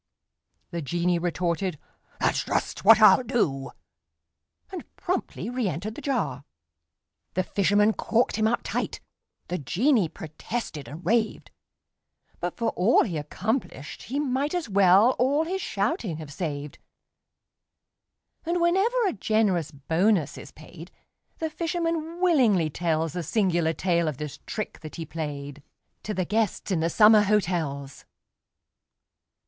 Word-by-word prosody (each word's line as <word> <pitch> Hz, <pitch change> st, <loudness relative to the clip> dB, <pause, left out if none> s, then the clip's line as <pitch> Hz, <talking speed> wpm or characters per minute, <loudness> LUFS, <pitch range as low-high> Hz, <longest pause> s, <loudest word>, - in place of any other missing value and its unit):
The 170 Hz, -1 st, -3 dB
genie 175 Hz, +4 st, 0 dB
retorted: 175 Hz, +1 st, -1 dB, 0.4 s
"That's -, -, +1 dB
just -, -, -2 dB
what 220 Hz, +2 st, +8 dB
I'll 215 Hz, +4 st, +7 dB
do!" 190 Hz, -, -1 dB, 1.0 s
And 370 Hz, -3 st, -6 dB
promptly 365 Hz, +2 st, -3 dB
reëntered 215 Hz, -, -2 dB
the 295 Hz, -, -9 dB
jar. 230 Hz, -, -2 dB, 0.9 s
The 185 Hz, -, +1 dB
fisherman 205 Hz, +3 st, +2 dB
corked 230 Hz, +3 st, +1 dB
him 220 Hz, 0 st, +2 dB
up 240 Hz, +2 st, 0 dB
tight: -, -, -3 dB, 0.5 s
The 180 Hz, -, -3 dB
genie 195 Hz, -, +2 dB
protested 155 Hz, -, -6 dB
and 155 Hz, +6 st, -10 dB
raved, 220 Hz, +3 st, 0 dB, 0.9 s
But 175 Hz, 0 st, -4 dB
for 230 Hz, -1 st, 0 dB
all 195 Hz, +8 st, +4 dB
he 180 Hz, -7 st, -4 dB
accomplished, 180 Hz, -, -4 dB
he 275 Hz, +4 st, -3 dB
might 285 Hz, +3 st, -1 dB
As 350 Hz, -6 st, -2 dB
well 200 Hz, +3 st, +5 dB
all 280 Hz, +5 st, +3 dB
his 380 Hz, +3 st, -3 dB
shouting 200 Hz, -, -2 dB
have 155 Hz, -2 st, -9 dB
saved. 145 Hz, -3 st, -5 dB, 1.6 s
And, 345 Hz, +1 st, -1 dB
whenever 395 Hz, +8 st, +2 dB
a 385 Hz, -, +1 dB
generous 200 Hz, -6 st, +1 dB
bonus 160 Hz, +4 st, +1 dB
is -, -, -10 dB
paid, 165 Hz, +3 st, -12 dB, 0.5 s
The 320 Hz, -1 st, -3 dB
fisherman 330 Hz, 0 st, -2 dB
willingly 240 Hz, -, +3 dB
tells 160 Hz, 0 st, -1 dB
The 180 Hz, -, -3 dB
singular 175 Hz, -2 st, +1 dB
tale 170 Hz, -1 st, +1 dB
of 150 Hz, -4 st, -3 dB
this 150 Hz, -1 st, -6 dB
trick 215 Hz, -, -5 dB
that 155 Hz, -2 st, -9 dB
he 165 Hz, -, -5 dB
played, 145 Hz, -3 st, -6 dB, 0.4 s
To 210 Hz, -, -4 dB
the 185 Hz, -, 0 dB
guests 215 Hz, +1 st, -1 dB
in 180 Hz, -, +1 dB
the 165 Hz, +1 st, +1 dB
summer 215 Hz, +3 st, +6 dB
hotels. 170 Hz, -9 st, -1 dB
195 Hz, 130 wpm, -26 LUFS, 160-240 Hz, 1.6 s, what